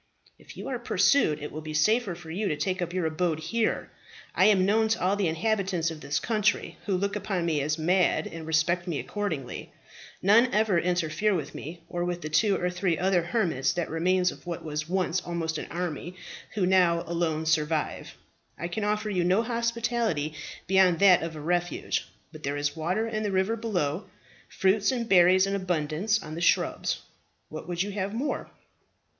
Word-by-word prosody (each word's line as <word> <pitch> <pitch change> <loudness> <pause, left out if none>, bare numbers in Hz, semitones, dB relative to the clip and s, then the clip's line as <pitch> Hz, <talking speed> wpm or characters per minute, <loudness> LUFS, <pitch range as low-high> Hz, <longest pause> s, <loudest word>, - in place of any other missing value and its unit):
"If - - -14
you - - -6
are - - -3
pursued, 155 - +2
it 150 - -5
will 155 - -6
be 155 0 -6
safer 215 +4 +2
for 165 -2 -10
you 200 +5 -1
to 150 - -1
take 185 +5 -1
up 175 -1 -2
your 180 -2 -1
abode 160 0 0
here. 220 +8 -1 0.4
I - - +4
am 195 -3 +5
known 220 +3 +3
to 225 +1 0
all 185 +2 +2
the 200 -3 +1
inhabitants 180 -1 0
of 155 -2 -9
this 140 +1 -1
country, 215 -2 0
who 195 -2 +1
look 200 +2 -1
upon 195 -4 -2
me 155 -4 +1
as 150 +2 -1
mad, 180 +3 +2
and 165 -1 -7
respect 170 +3 +1
me 165 -4 -1
accordingly. 160 -12 -4 0.5
None 230 +6 +5
ever 210 -5 +3
interfere 180 +3 +1
with 150 -5 -4
me, 165 +3 -8
or 175 0 -3
with 175 0 -2
the 155 - -5
two 190 +6 +2
or 180 - 0
three 180 -2 0
other 185 0 +2
hermits, 170 - 0
the 175 -2 -1
remains 180 +3 +1
of - - -14
what 170 -2 -5
was 150 0 -4
once 185 -1 0
almost 165 -2 -3
an - - -6
army, 175 0 -4 0.4
who 200 -4 +2
now 180 -2 +3
alone 165 -2 -1
survive. 155 -1 -1 0.4
I 170 - -4
can 215 +4 -3
offer 210 +1 0
you 180 -3 +1
no 185 +6 +3
hospitality 235 -9 -1 0.3
beyond 190 -2 +4
that 190 -1 +6
of 165 0 -4
a - - -7
refuge; 175 - -1 0.2
but 155 - -11
there 140 0 -2
is 145 0 -1
water 180 +8 -1
in 215 -1 -2
the 210 - -1
river 190 +4 +1
below, 185 -8 -2 0.4
fruits 195 +5 +2
and 240 -3 -2
berries 185 -1 +6
in 195 - -2
abundance 185 +2 0
on 155 - -8
the 165 - -5
shrubs. 170 - +1 0.5
What 155 +1 -8
would 175 0 -1
you 205 - -5
have 200 +1 -3
more?" 280 +5 -2
180 Hz, 195 wpm, -27 LUFS, 160-200 Hz, 0.5 s, that